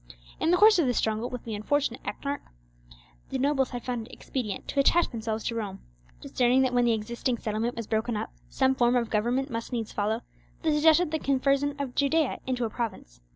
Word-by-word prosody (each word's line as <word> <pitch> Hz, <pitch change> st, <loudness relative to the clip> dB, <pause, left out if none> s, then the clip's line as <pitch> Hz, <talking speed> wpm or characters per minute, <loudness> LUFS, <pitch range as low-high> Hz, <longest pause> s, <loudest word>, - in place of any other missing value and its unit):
In -, -, +1 dB
the 355 Hz, -, +5 dB
course 425 Hz, 0 st, +7 dB
of 310 Hz, -, +3 dB
the 245 Hz, -, +1 dB
struggle 220 Hz, +3 st, 0 dB
with 250 Hz, -2 st, -6 dB
the 225 Hz, -, -5 dB
unfortunate 245 Hz, +4 st, -1 dB
ethnarch, 285 Hz, 0 st, -4 dB, 0.9 s
the -, -, -2 dB
nobles 270 Hz, 0 st, +1 dB
had 245 Hz, -2 st, -6 dB
found 240 Hz, -3 st, -3 dB
it -, -, -15 dB
expedient 220 Hz, -7 st, -5 dB
to 280 Hz, -, -1 dB
attach 340 Hz, +5 st, +4 dB
themselves 225 Hz, -2 st, -3 dB
to 235 Hz, -, -2 dB
Rome. 205 Hz, -4 st, -4 dB, 0.4 s
Discerning 260 Hz, -1 st, +2 dB
that 255 Hz, -1 st, 0 dB
when 245 Hz, 0 st, +3 dB
the 235 Hz, -, +3 dB
existing 235 Hz, +3 st, -2 dB
settlement 220 Hz, +2 st, -2 dB
was 230 Hz, -, -4 dB
broken 220 Hz, +1 st, -1 dB
up 215 Hz, -, -4 dB, 0.2 s
some 265 Hz, -1 st, +2 dB
form 245 Hz, -1 st, +3 dB
of 235 Hz, -2 st, 0 dB
government 245 Hz, +6 st, 0 dB
must 230 Hz, +2 st, -4 dB
needs 230 Hz, -3 st, -3 dB
follow, 215 Hz, +3 st, -1 dB, 0.4 s
they 315 Hz, -2 st, +2 dB
suggested 315 Hz, +2 st, +4 dB
the 315 Hz, -, 0 dB
conversion 275 Hz, +1 st, +1 dB
of 275 Hz, -3 st, -4 dB
Judea 285 Hz, +1 st, +1 dB
into 250 Hz, -2 st, 0 dB
a -, -, -2 dB
province. 190 Hz, -, -5 dB
245 Hz, 205 wpm, -27 LUFS, 225-280 Hz, 0.9 s, course